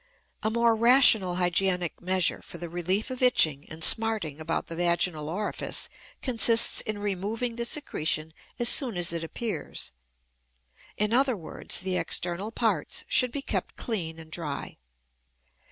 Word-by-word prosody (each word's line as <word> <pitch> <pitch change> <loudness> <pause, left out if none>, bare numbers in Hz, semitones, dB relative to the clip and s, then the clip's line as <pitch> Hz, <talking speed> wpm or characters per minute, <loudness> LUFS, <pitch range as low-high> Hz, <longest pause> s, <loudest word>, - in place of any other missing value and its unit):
A 220 - 0
more 235 0 +2
rational 225 -6 +5
hygienic 180 -1 0
measure 185 0 0
for - - -11
the 175 - -7
relief 180 +7 -2
of 255 - -6
itching 155 - +3
and 160 0 -5
smarting 215 -10 +3
about 160 +1 -3
the 165 - -8
vaginal 170 -3 0
orifice 205 +6 -2 0.3
consists 230 -2 +5
in 215 -1 -4
removing 205 +4 -3
the 235 0 -3
secretion 160 - -1 0.2
as 240 - +1
soon 245 -6 +2
as 175 -1 +3
it 165 -1 -3
appears. 165 - -5 1.1
In 210 +1 +1
other 260 -2 +2
words, 170 - -2
the 185 0 -2
external 180 +5 -3
parts 220 -9 -1
should 250 -2 +2
be 280 +1 -5
kept - - -3
clean 175 -9 -4
and 160 -1 -13
dry. 150 - -6
190 Hz, 145 wpm, -27 LUFS, 170-230 Hz, 1.1 s, rational